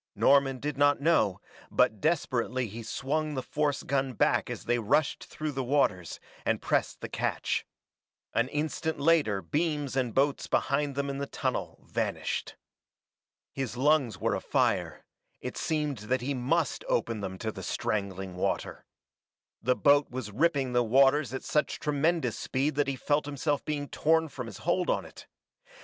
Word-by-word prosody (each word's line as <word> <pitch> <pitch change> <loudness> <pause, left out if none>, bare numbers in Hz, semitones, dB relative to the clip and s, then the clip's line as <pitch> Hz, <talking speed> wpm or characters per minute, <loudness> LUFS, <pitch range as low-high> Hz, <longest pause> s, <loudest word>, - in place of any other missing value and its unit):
Norman 135 -1 +4
did 145 +1 -4
not 145 0 +4
know, 140 - +2 0.3
but 105 -2 +2
desperately 130 -6 0
he 115 +2 -7
swung 150 +6 -2
the 130 - -2
force 145 +1 -1
gun 135 -1 0
back - - +2
as - - -6
they 120 0 +2
rushed 135 +7 +1
through 155 0 -4
the 135 -2 -2
waters, 120 - +1 0.2
and - - +1
pressed - - 0
the - - -4
catch. - - -1 0.7
An 120 +2 +2
instant 155 +2 -2
later 140 - +3
beams 150 - -1
and 125 -4 0
boats 140 +1 +2
behind 140 0 +1
them 140 0 -1
in 140 0 -3
the 140 - -3
tunnel - - -3
vanished. - - -2 1.0
His 130 -3 -4
lungs 140 -3 +3
were 115 -1 0
afire; 100 - 0 0.3
it - - -6
seemed 150 -5 -1
that 120 +5 -1
he 140 +3 -1
must 140 +4 0
open 115 -2 0
them 95 -1 -4
to 110 +3 -3
the 95 - -8
strangling 100 -3 -2
water. 90 - -2 0.7
The 125 +3 +2
boat 145 +1 +4
was 125 -4 -5
ripping 135 0 +1
the 125 - +4
waters 135 +3 +4
at 130 - -4
such 150 - 0
tremendous 155 +3 +1
speed 140 +3 -1
that 145 0 +1
he 140 - -1
felt 145 +2 0
himself 145 0 -1
being 145 -2 -2
torn 160 +2 +2
from 125 -3 -6
his - - -8
hold 175 +2 0
on - - +1
it. - - -13
135 Hz, 165 wpm, -29 LUFS, 120-150 Hz, 1.0 s, Norman